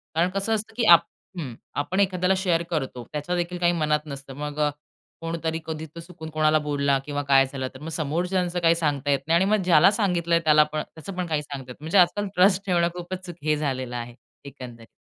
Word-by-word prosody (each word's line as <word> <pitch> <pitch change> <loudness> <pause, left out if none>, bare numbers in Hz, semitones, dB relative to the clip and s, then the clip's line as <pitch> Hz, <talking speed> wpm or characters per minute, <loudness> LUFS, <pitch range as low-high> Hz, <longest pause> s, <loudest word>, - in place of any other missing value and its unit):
कारण 170 +3 +2
कसं 195 +3 0
असतं, 220 +1 -5
की 235 - +1
आप 170 -2 +8 0.4
हं, 130 -7 -5 0.2
आपण 185 +7 -1
एखाद्याला 185 -1 +2
शेअर 175 -3 +1
करतो. 135 -7 -3
त्याच्यादेखील 175 +3 -2
काही 175 0 +3
मनात 150 -2 +1
नसतं. 140 -2 -8
मग 150 0 -5
अ, 150 -1 +3 0.5
कोणतरी 165 -1 -3
कधी 160 0 -5
तो 170 - -7
चुकून 165 -2 -10
कोणाला 155 0 +2
बोलला 140 -2 +1
किंवा 145 -1 -3
काय 135 -1 +6
झालं 130 -1 -5
तर 130 - -11
मग 160 - -6
समोरच्याचं 175 +3 -1
काही 170 -1 +4
सांगता 145 -4 -1
येत 140 - +2
नाही. 165 - +3
आणि 185 - +4
मग 215 -3 +2
ज्याला 175 +1 +6
सांगितलंय 175 -5 +1
त्याला 150 -1 +6
पण 155 - 0
त्याचं 165 +4 -8
पण 180 - -1
काही 155 -2 0
सांगता 135 -3 -8
येत - - -9
नाही. 150 - -10
म्हणजे 170 +5 +1
आजकाल 190 +3 +3
ट्रस्ट 190 +1 +4
ठेवणं 175 -3 +2
खूपच 180 +1 -7
हे 155 0 +2
झालेलं 130 -4 -3
आहे. 120 0 -6 0.3
एकंदरीत. 125 -4 -10
160 Hz, 210 wpm, -24 LUFS, 145-180 Hz, 0.5 s, आप